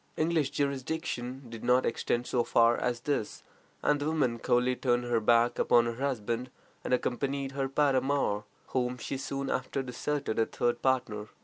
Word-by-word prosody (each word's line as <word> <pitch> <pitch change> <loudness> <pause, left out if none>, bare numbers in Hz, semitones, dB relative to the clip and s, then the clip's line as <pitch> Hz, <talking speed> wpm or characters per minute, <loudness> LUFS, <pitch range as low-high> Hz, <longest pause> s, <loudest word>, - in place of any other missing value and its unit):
English 160 -3 +1
jurisdiction 140 -2 -3
did 115 -1 -9
not 125 +1 +3
extend 120 +1 -1
so 120 -1 +1
far 115 0 +4
as 120 -1 -1
this, 140 -6 -2 0.4
and 145 0 +3
the 145 - -2
woman 130 -7 +1
coolly 125 +1 +2
turned 120 -1 +1
her 120 -1 +1
back 120 +2 +3
upon 120 -1 +4
her 120 +3 -3
husband 125 -2 -2 0.3
and - - -4
accompanied 135 +2 -1
her 135 -1 -2
paramour, 135 -6 +1 0.3
whom 125 -1 -1
she 130 - -4
soon 135 +1 -3
after 135 +1 -2
deserted 135 0 -3
for - - +4
a - - +3
third 120 0 -1
partner. 120 -5 0
125 Hz, 170 wpm, -30 LUFS, 120-140 Hz, 0.4 s, far